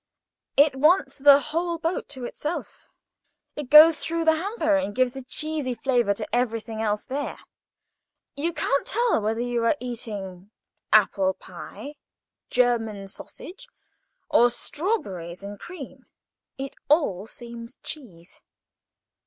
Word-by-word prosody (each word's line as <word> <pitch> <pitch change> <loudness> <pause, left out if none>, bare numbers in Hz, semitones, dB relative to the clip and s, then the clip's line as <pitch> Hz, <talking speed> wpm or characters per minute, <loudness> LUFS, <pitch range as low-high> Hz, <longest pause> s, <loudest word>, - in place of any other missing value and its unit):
It 285 -1 +5
wants 295 0 +3
the 280 0 +8
whole 335 +3 -2
boat 330 +2 -2
to 255 -2 -6
itself. 305 +7 -6 0.7
It 295 -4 -6
goes 310 +2 +9
through 330 0 -1
the 320 0 +5
hamper, 325 -3 0
and 205 -8 -1
gives 255 0 +2
a 270 - -5
cheesy 295 -1 -3
flavour 240 -4 +1
to 215 +3 -3
everything 225 -2 -1
else 210 -1 -1
there. 280 +2 -4 1.0
You 320 +4 -1
can't 280 -4 0
tell 470 - +2
whether 220 +2 -1
you 240 -1 -1
are 230 +6 +2
eating 205 -6 -5 0.4
apple 195 -3 +4
pie 195 +6 -10
or - - -11 0.6
German 225 -5 +1
sausage, 355 - -9 0.6
or 240 +1 +5
strawberries 205 - -3
and 205 0 -8
cream. 275 -7 -10 0.5
It 270 0 -6
all 220 - +2
seems 235 +1 -9
cheese. 190 - -9
250 Hz, 130 wpm, -25 LUFS, 215-305 Hz, 1.0 s, goes